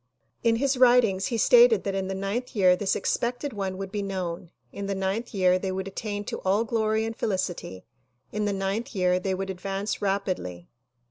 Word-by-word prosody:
In 230 -1 +4
his 270 +2 +1
writings 240 -6 +4
he 235 - -1
stated 480 - +6
that 195 - -2
in 195 -1 -2
the 190 - -3
ninth 210 +7 -3
year 185 -3 +5
this 190 +1 0
expected 245 +3 -1
one 195 -2 -3
would 195 0 -6
be 205 -1 -2
known; 180 -4 -4 0.2
in 200 0 -5
the 200 - -1
ninth 195 +5 -2
year 185 -3 +3
they 190 0 -2
would 190 0 -3
attain 205 +1 -4
to - - -4
all 195 +4 +1
glory 220 -1 0
and 225 0 -4
felicity; 185 - -3 0.5
in 210 +1 -1
the 205 - +1
ninth 195 +4 -2
year 180 -1 +2
they 190 0 -1
would 195 +1 -3
advance 195 +3 -3
rapidly. 185 - -2
195 Hz, 195 wpm, -26 LUFS, 190-220 Hz, 0.5 s, stated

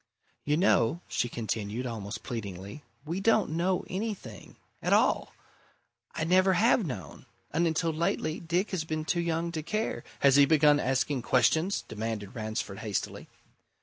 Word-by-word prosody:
"You 150 +1 +2
know," 170 - +3
she 120 - -1
continued, 110 +1 -3
almost 110 -2 -5
pleadingly. 100 +1 -6 0.2
"We 170 +5 -3
don't 220 -3 +3
know 175 +3 0
anything 190 - -5 0.3
at - - +1
all. - - +3 0.8
I - - -1
never 185 +3 +4
have 230 +5 +4
known, 95 - -7 0.2
and 170 +2 +2
until 165 0 0
lately 155 0 -1
Dick 175 +4 -1
has 185 -5 -1
been 155 -1 -3
too 170 +2 +1
young 170 0 -1
to 160 -2 -3
care 215 +8 -2
" - - -23
"Has 140 -1 +6
he 140 - +8
begun 150 -1 +5
asking 135 +1 0
questions?" 160 +10 +2
demanded 110 -2 -4
Ransford 110 -3 -4
hastily. 105 -3 -3
155 Hz, 150 wpm, -29 LUFS, 115-170 Hz, 0.8 s, he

